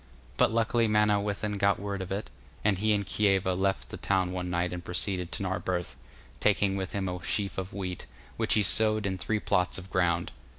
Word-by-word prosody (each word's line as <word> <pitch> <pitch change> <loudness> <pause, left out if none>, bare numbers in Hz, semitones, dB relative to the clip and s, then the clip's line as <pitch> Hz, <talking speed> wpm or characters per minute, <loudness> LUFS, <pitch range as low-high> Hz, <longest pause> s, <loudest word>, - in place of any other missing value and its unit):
But - - +4
luckily 115 +1 +2
Manawyddan 105 -1 +1
got 100 0 +3
word 100 -1 -3
of 95 - -6
it, 100 +2 -3 0.3
and 100 -3 +3
he 110 +1 +2
and 100 -1 +1
Kieva 95 -1 +2
left 95 +1 0
the - - -6
town 95 -2 +1
one 90 -1 -3
night 90 0 0
and 90 -1 -5
proceeded 90 0 -1
to - - -3
Narberth, 90 -1 -2 0.4
taking 100 +1 +2
with 95 -2 -3
him 100 -1 -2
a 90 -1 -4
sheaf 100 +6 -2
of 95 0 -5
wheat, 90 -2 -5 0.3
which 110 -1 +1
he 105 - +4
sowed 110 +1 +3
in 95 -1 -2
three 110 +3 0
plots 90 -3 +1
of 95 0 -9
ground. 85 -2 +1
95 Hz, 200 wpm, -29 LUFS, 90-105 Hz, 0.4 s, But